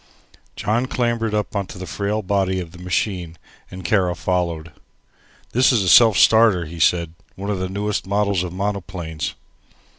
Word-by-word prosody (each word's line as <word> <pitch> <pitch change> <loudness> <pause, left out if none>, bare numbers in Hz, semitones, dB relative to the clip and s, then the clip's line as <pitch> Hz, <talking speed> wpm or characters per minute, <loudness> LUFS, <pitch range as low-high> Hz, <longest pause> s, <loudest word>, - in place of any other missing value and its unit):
John 120 +4 0
clambered 120 -4 -1
up 105 +1 -2
into 100 -2 -4
the 95 - -6
frail 105 +3 -2
body 95 -1 0
of 85 -3 -7
the 90 - -14
machine 90 -2 -2 0.3
and 90 -1 -9
Kara 90 -2 +1
followed. 85 -3 -2 0.8
"This 130 +3 +4
is 115 -6 +2
a 95 - +1
self 110 +1 +7
starter," 110 -6 +5
he 85 +2 -9
said, 85 0 +2 0.2
"one 100 +2 -4
of 100 - -2
the 95 0 -3
newest 100 +1 -2
models 100 -2 +1
of 90 -1 -4
monoplanes." 90 -5 -4
95 Hz, 160 wpm, -21 LUFS, 90-105 Hz, 0.8 s, self